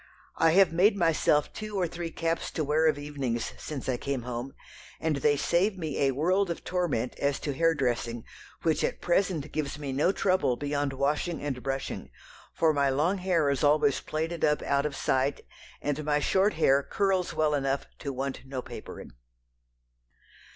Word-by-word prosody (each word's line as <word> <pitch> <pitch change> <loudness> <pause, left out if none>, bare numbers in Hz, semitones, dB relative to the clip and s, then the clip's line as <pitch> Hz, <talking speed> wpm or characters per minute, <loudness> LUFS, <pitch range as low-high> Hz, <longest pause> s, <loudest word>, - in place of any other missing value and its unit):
I 165 -1 +4
have 185 -3 +5
made 200 +5 +4
myself 160 -4 +2
two 215 -1 -5
or 180 - +2
three 170 0 -5
caps 165 0 -2
to 155 - -1
wear 155 +2 +2
of 155 - +2
evenings 140 -5 -3
since 145 -5 -6
I 130 -2 0
came 135 -1 -3
home, 125 +2 -5 0.4
and 160 -3 0
they 145 +1 +2
save 190 +7 +1
me 160 -5 -3
a 135 -1 +3
world 185 +6 +2
of 170 - -4
torment 170 -10 -1
as 140 -1 0
to 145 - -2
hair 165 +3 +2
dressing, 120 -4 -1 0.4
which 160 -2 +1
at - - -1
present 175 -5 0
gives 145 -2 -3
me 140 -2 -4
no 150 +7 +3
trouble 185 -10 +1
beyond 145 +1 -2
washing 150 +5 -1
and 135 -4 -3
brushing, 135 +1 -4 0.4
for 160 -1 +2
my 140 -1 +2
long 160 +9 +1
hair 180 -5 +1
is 140 - -1
always 145 -1 +3
plaited 160 +2 -3
up 150 -1 +2
out 140 +1 +1
of 145 - -6
sight, 135 +2 0 0.4
and 145 +1 -1
my 150 0 +2
short 190 +7 +2
hair 140 -3 +4
curls 190 +3 0
well 155 -1 +2
enough 135 -1 0
to 140 - -4
want 135 +1 -4
no 130 -1 -5
papering." - - -9
150 Hz, 180 wpm, -28 LUFS, 135-165 Hz, 0.4 s, have